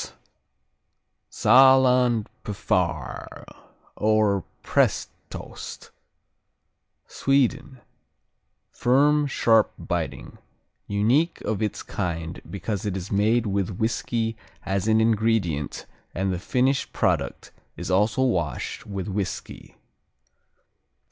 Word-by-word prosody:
S -, -, -22 dB, 1.2 s
Saaland 125 Hz, -2 st, +5 dB, 0.2 s
Pfarr, 90 Hz, -, -2 dB, 0.5 s
or 105 Hz, -3 st, +2 dB, 0.2 s
Prestost -, -, -2 dB, 1.1 s
Sweden 135 Hz, 0 st, 0 dB, 0.9 s
Firm; 145 Hz, +4 st, +3 dB
sharp; 115 Hz, -4 st, +3 dB
biting; -, -, -4 dB, 0.5 s
unique 115 Hz, +12 st, +1 dB
of 110 Hz, -1 st, -2 dB
its 105 Hz, -, -2 dB
kind 85 Hz, -3 st, -4 dB
because 100 Hz, 0 st, -4 dB
it 100 Hz, -2 st, -2 dB
is 95 Hz, +1 st, -7 dB
made 110 Hz, +4 st, +2 dB
with 100 Hz, -2 st, -2 dB
whiskey 115 Hz, 0 st, -1 dB, 0.3 s
as 95 Hz, +1 st, -1 dB
an 110 Hz, 0 st, +4 dB
ingredient 110 Hz, -9 st, 0 dB, 0.3 s
and 95 Hz, +1 st, 0 dB
the 90 Hz, -, -3 dB
finished 130 Hz, +7 st, 0 dB
product -, -, -1 dB, 0.3 s
is -, -, -4 dB
also 105 Hz, +7 st, +2 dB
washed 85 Hz, -, -2 dB
with 100 Hz, -1 st, -4 dB
whiskey. 100 Hz, -2 st, -5 dB
110 Hz, 90 wpm, -24 LUFS, 95-125 Hz, 1.2 s, Saaland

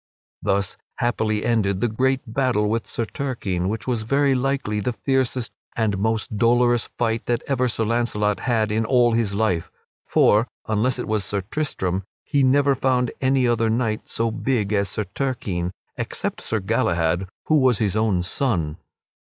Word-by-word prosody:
Thus 100 Hz, -1 st, 0 dB, 0.2 s
happily 110 Hz, -3 st, 0 dB
ended 100 Hz, -5 st, +1 dB
that 115 Hz, -3 st, 0 dB
great 130 Hz, +2 st, +2 dB
battle 120 Hz, -3 st, +1 dB
with 115 Hz, +1 st, -1 dB
Sir 115 Hz, -, -2 dB
Turquine 105 Hz, -8 st, -2 dB
which 110 Hz, +1 st, -3 dB
was 120 Hz, -3 st, 0 dB
very 140 Hz, +5 st, +2 dB
likely 130 Hz, -5 st, 0 dB
the 120 Hz, +4 st, -1 dB
fiercest 130 Hz, -1 st, 0 dB, 0.3 s
and 105 Hz, -4 st, +1 dB
most 110 Hz, 0 st, -1 dB
dolorous 120 Hz, 0 st, +3 dB
fight 115 Hz, -1 st, -1 dB
that 120 Hz, -1 st, 0 dB
ever 130 Hz, -2 st, +1 dB
Sir 115 Hz, -1 st, -1 dB
Launcelot 105 Hz, -3 st, 0 dB
had 110 Hz, -4 st, +1 dB
in 110 Hz, +1 st, +1 dB
all 120 Hz, 0 st, +4 dB
of 115 Hz, -, +2 dB
his 100 Hz, -4 st, 0 dB
life. 100 Hz, -6 st, 0 dB, 0.4 s
For, 110 Hz, +4 st, +4 dB, 0.2 s
unless 110 Hz, +4 st, +1 dB
it 125 Hz, -, -4 dB
was 110 Hz, -2 st, 0 dB
Sir 100 Hz, 0 st, -1 dB
Tristram, 95 Hz, -6 st, -2 dB, 0.2 s
he 145 Hz, -2 st, +1 dB
never 140 Hz, +2 st, +4 dB
found 125 Hz, -2 st, +1 dB
any 130 Hz, -1 st, +3 dB
other 115 Hz, -1 st, +2 dB
knight 110 Hz, -1 st, -1 dB
so 115 Hz, 0 st, 0 dB
big 110 Hz, -3 st, -1 dB
as 100 Hz, -2 st, +1 dB
Sir 105 Hz, -, -2 dB
Turquine 100 Hz, -5 st, -2 dB, 0.3 s
except -, -, -4 dB
Sir 110 Hz, -, -1 dB
Galahad, 90 Hz, -3 st, +1 dB, 0.2 s
who 155 Hz, -, +3 dB
was 130 Hz, -4 st, +4 dB
his 105 Hz, -2 st, 0 dB
own 105 Hz, -5 st, +2 dB
son. 90 Hz, -, -1 dB
115 Hz, 170 wpm, -23 LUFS, 105-125 Hz, 0.4 s, all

